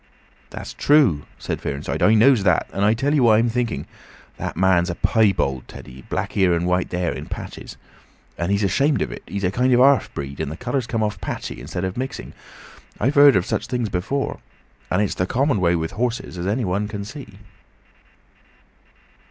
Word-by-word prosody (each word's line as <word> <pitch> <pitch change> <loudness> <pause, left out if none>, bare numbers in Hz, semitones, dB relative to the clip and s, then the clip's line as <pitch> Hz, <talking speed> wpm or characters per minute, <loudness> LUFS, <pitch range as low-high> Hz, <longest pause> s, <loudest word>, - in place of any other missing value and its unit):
"That's - - -8
true," 135 - +3
said - - -4
Fearenside. 70 +1 -4
"I 110 - +5
knows 120 +1 +5
that. 90 -4 +2
And 100 - -1
I 105 +2 +4
tell 135 +5 0
'ee 150 - +3
what 115 -4 +5
I'm 115 +2 +2
thinking. 120 0 -2 0.5
That - - -5
marn's 90 -1 +3
a 85 - -3
piebald, 90 - +1
Teddy. 65 +2 -11
Black - - -2
here 95 -3 +2
and 85 +1 -1
white 90 0 0
there—in 90 -1 -3
patches. - - -8 0.6
And 85 +3 -2
he's 100 +1 +1
ashamed 135 +6 +2
of - - -5
it. - - -8
He's 100 +3 -4
a 90 - +1
kind 125 +5 +1
of 120 - +5
half 135 -3 +4
breed, 70 0 -6
and 70 - -3
the 80 - -7
colour's 125 +1 -2
come 115 -2 -1
off 105 0 -3
patchy - - -5
instead 90 - -5
of 95 +2 -3
mixing. 130 +2 -5 0.7
I've 135 - +1
heard 145 -1 +7
of 90 -2 +2
such - - -2
things 120 -4 -2
before. 105 +10 -2 0.5
And 90 +3 +2
it's 100 - -1
the 90 - -1
common 130 -1 +1
way 85 -1 +3
with 80 -1 -2
horses, 125 -1 -3
as 90 +1 -4
any 110 +4 0
one 100 +3 -1
can 100 -1 -6
see." 110 -5 -10
105 Hz, 195 wpm, -22 LUFS, 90-125 Hz, 0.7 s, heard